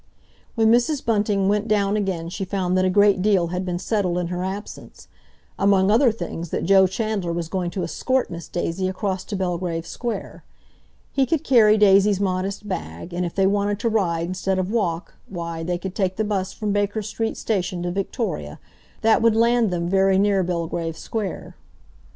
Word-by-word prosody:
When 225 -2 +4
Mrs. 245 +5 +2
Bunting 205 -3 +1
went 210 +2 +1
down 205 -1 +2
again 190 -5 -2
she 195 - -4
found 185 -1 -1
that 185 0 +3
a - - +3
great 200 0 +4
deal 190 -4 +2
had 180 +1 -2
been 180 -1 -2
settled 185 -2 -1
in 175 -1 -2
her 180 0 -3
absence; 195 +3 -7 0.5
among 195 0 +4
other 240 +2 +5
things, 170 -6 -6
that - - -2
Joe 190 +1 +6
Chandler 205 -3 -2
was 170 -1 -3
going 180 -2 -2
to 180 +1 -4
escort 255 +9 -1
Miss 170 -2 -7
Daisy 175 +2 -2
across 190 0 -2
to 205 - -5
Belgrave 175 -3 -2
Square. 225 +1 -5 0.7
He 270 -2 +1
could 320 -3 0
carry 220 -4 +5
Daisy's 200 -1 +5
modest 195 +1 -2
bag, 80 - -6
and 175 0 -1
if 170 - -9
they 195 - +3
wanted 205 +1 +1
to 230 - +1
ride 170 -7 0
instead 185 +1 -1
of 185 +1 -1
walk, 175 -7 -1
why, 170 -3 -5
they 175 +2 -2
could 185 +1 -6
take 190 -2 -1
the 220 - 0
bus 200 -3 -2
from 210 -1 -3
Baker 205 +1 0
Street 225 +2 -3
Station 180 -4 -2
to 175 - -2
Victoria—that 195 - -2
would 225 -1 +4
land 235 0 +3
them 170 -1 -2
very 190 +1 +3
near 200 -1 +3
Belgrave 170 -2 -3
Square. 215 -4 -5
195 Hz, 185 wpm, -23 LUFS, 180-210 Hz, 0.7 s, Joe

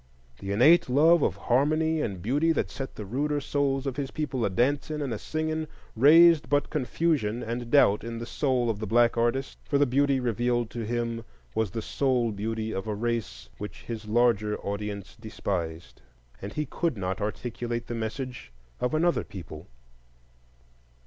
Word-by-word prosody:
The 100 - -5
innate 130 +10 +5
love 160 +6 +5
of 95 - +1
harmony 155 +9 +1
and 95 -8 -4
beauty 145 +9 +2
that - - -1
set 135 0 -6
the 105 - -6
ruder 145 +7 -1
souls 140 -1 -1
of 135 -1 -3
his 140 -2 -2
people 140 -5 -3
a 100 - +2
dancing 140 +8 0
and 140 -5 -2
a 105 - -4
singing 155 0 -2 0.3
raised 160 +5 +6
but 145 0 +1
confusion 135 -5 0
and 120 +1 -4
doubt 110 -7 +4
in 115 0 -5
the 115 - -5
soul 130 -1 0
of 105 - -6
the 110 - -4
black 120 +2 +4
artist; 120 +3 -1
for 145 - 0
the 145 - +4
beauty 140 +1 +2
revealed 120 -1 0
to 120 - -4
him 115 -1 -2 0.3
was 110 +4 0
the 115 +3 -5
soul 125 -4 +1
beauty 110 +2 -3
of 95 +3 -4
a 105 - -2
race 115 - -3
which 105 - -7
his 110 -2 -6
larger 110 -2 +2
audience 100 -1 -5
despised, 85 -7 -5 0.4
and 100 +1 -6
he 150 - -2
could 160 -1 -2
not 95 +1 -3
articulate 120 +2 -3
the - - -5
message 120 - -5 0.3
of 125 +5 0
another 170 +2 +2
people. 90 -5 -10
120 Hz, 170 wpm, -27 LUFS, 110-145 Hz, 0.4 s, raised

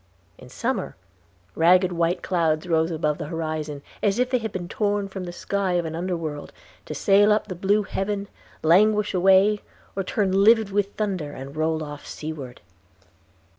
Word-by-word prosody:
In - - -13
summer - - -3 0.6
ragged 180 +2 +4
white 170 +1 0
clouds 165 -3 +1
rose 160 -1 +2
above 155 -2 -1
the 155 - -4
horizon, 155 -3 -4 0.2
as 205 0 +1
if 250 +1 +1
they 250 - +2
had 220 -2 -4
been 185 -2 -5
torn 205 0 -1
from 190 -1 -6
the 175 - -6
sky 195 +1 -2
of 175 -1 +1
an 160 0 -4
underworld, 165 -4 -4 0.4
to 155 - -5
sail 200 +6 +4
up 210 - +2
the 195 - -6
blue 200 +4 +1
heaven, 200 +1 -3 0.4
languish 210 +5 +4
away, 195 +3 +4 0.3
or 195 - -1
turn 195 +1 0
livid 220 -1 +5
with 200 0 -1
thunder, 185 -9 -2
and 135 +2 -9
roll 160 0 0
off 145 -1 -9
seaward. 150 -5 -7
180 Hz, 170 wpm, -24 LUFS, 160-200 Hz, 0.6 s, livid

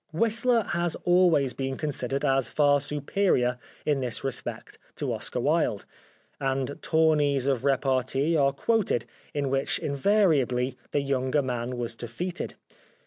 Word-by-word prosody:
Whistler 230 +6 +2
has 170 -2 -1
al 180 +1 +5
ways 140 -5 +2
been 135 0 -3
considered 140 -2 -2
as 135 -3 +2
far 145 -1 +3
superior 145 -3 0 0.3
in 145 -2 +1
this 125 -3 -2
respect 135 -1 -4 0.2
to - - -2
Oscar - - -3
Wilde, - - +1 0.5
and 135 +1 -2
tourneys 150 -4 +2
of 135 -3 0
repartee 135 +2 +1
are 140 -3 +3
quoted 200 - 0 0.3
in 140 -2 -1
which 135 0 +1
invariably 140 - +1
the 145 - 0
younger 140 +1 0
man 125 -1 -3
was 120 -1 -3
defeated. 170 +11 -5
140 Hz, 135 wpm, -27 LUFS, 130-160 Hz, 0.5 s, al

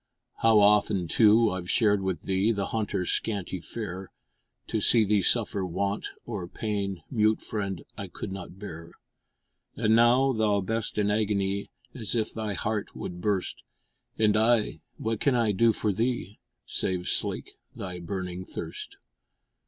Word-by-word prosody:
How 115 -1 +5
often, 105 -3 +4
too, 110 +3 +5
I 95 - -2
we 90 - -8
shared 105 0 +3
with 95 -4 -2
thee 95 +3 +2
The 100 -3 -2
hunter's 105 -5 -1
scanty 100 -4 -2
fare. 95 -1 -6 0.5
To 110 - -2
see 110 +1 +5
thee 105 0 +3
suffer 105 -2 +2
want 100 +3 -2 0.2
or 100 -7 -4
pain, 100 -3 -3
Mute 110 -3 +3
friend 100 -4 -4 0.2
I - - -4
could - - -7
not 95 -1 -7
bear; 85 -4 -9 0.8
And 110 -1 +3
now, 125 +3 +5
thou 110 -3 +2
best 110 +3 -2
in 105 -1 +2
agony, 100 -2 0 0.2
As 115 -2 -2
if 110 -2 0
thy 110 -3 -3
heart 105 +2 -2
would 90 0 -6
burst, 100 -1 -1 0.6
And 105 -1 +3
I, 110 0 +3 0.2
what 110 -1 -2
can 140 -3 +2
I 115 -3 +3
do 115 +4 +4
for 105 -1 0
thee, 115 -1 -2 0.3
Save 90 -1 -1
slake - - -1 0.2
thy 90 -2 -5
burning 90 +1 -4
thirst? - - -7
105 Hz, 150 wpm, -28 LUFS, 95-110 Hz, 0.8 s, How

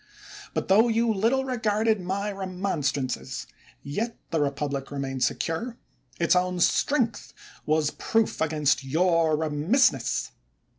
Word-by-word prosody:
But - - -1
tho 215 +5 +5
you 230 0 +2
little 235 +7 +1
regarded 220 -4 +1
my 200 +3 -2
remonstrances, 165 - -2 0.4
yet 215 +12 -3
the 160 - +1
republic 140 -1 -2
remained 135 -2 -3
secure; 230 +9 -2 0.4
its 170 +1 +3
own 180 0 +1
strength 245 - +1 0.3
was 155 -1 +2
proof 225 -6 0
against 150 -3 +1
your 165 +2 +2
remissness. 155 - +1
180 Hz, 110 wpm, -26 LUFS, 150-220 Hz, 0.4 s, tho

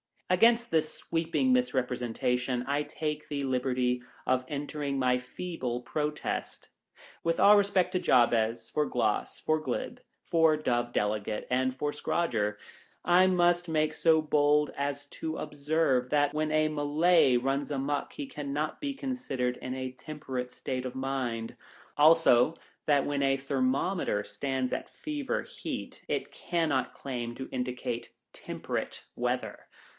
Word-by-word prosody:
Against 230 +5 +4
this 155 -1 +1
sweeping 165 +11 0
misrepresentation, 125 - 0
I 140 +2 0
take 150 0 -4
the 145 -1 -3
liberty 125 -1 0 0.2
of 130 0 +1
entering 145 -1 -3
my 125 -1 +2
feeble 125 -2 -4
protest. 150 +3 -3 0.5
With 165 0 0
all 205 +1 +8
respect 200 -2 +2
for 185 - +1
Jabez, 120 -4 +3
for 150 - +1
Gloss, 115 -6 -1
for 155 0 +1
Glib, 135 -5 -4 0.2
for 160 -2 +4
Dove 120 -5 0
Delegate, 105 0 -1
and 130 0 +1
for 145 +2 -1
Scradger, 115 -12 0 0.5
I 180 +2 +5
must 175 -1 +3
make 155 -1 +1
so 160 -1 +4
bold 150 0 +3
as 140 0 -2
to 160 +2 -5
observe 145 -3 0
that 145 -1 +3
when 155 0 0
a 155 0 +3
Malay 150 -1 +3
runs 135 +3 0
a 145 - -2
muck 140 +1 -2
he 290 - -5
cannot 150 - -3
be 285 -1 -2
considered 250 - -2
in 130 0 -5
a 130 -1 -4
temperate 130 -2 -5
state 130 -1 -4
of 130 0 -5
mind; 130 -4 -3 0.4
also, 155 -2 +6 0.3
that 145 -2 +4
when 145 -1 -1
a 135 0 +3
thermometer 135 - 0
stands 130 +2 -2
at - - -3
Fever 295 -3 -3
Heat, - - -7
it - - -2
cannot 160 -6 -1
claim 120 -3 -4
to 130 - -7
indicate 125 -2 -3 0.2
Temperate - - -5
weather. - - -2
140 Hz, 140 wpm, -29 LUFS, 125-160 Hz, 0.5 s, all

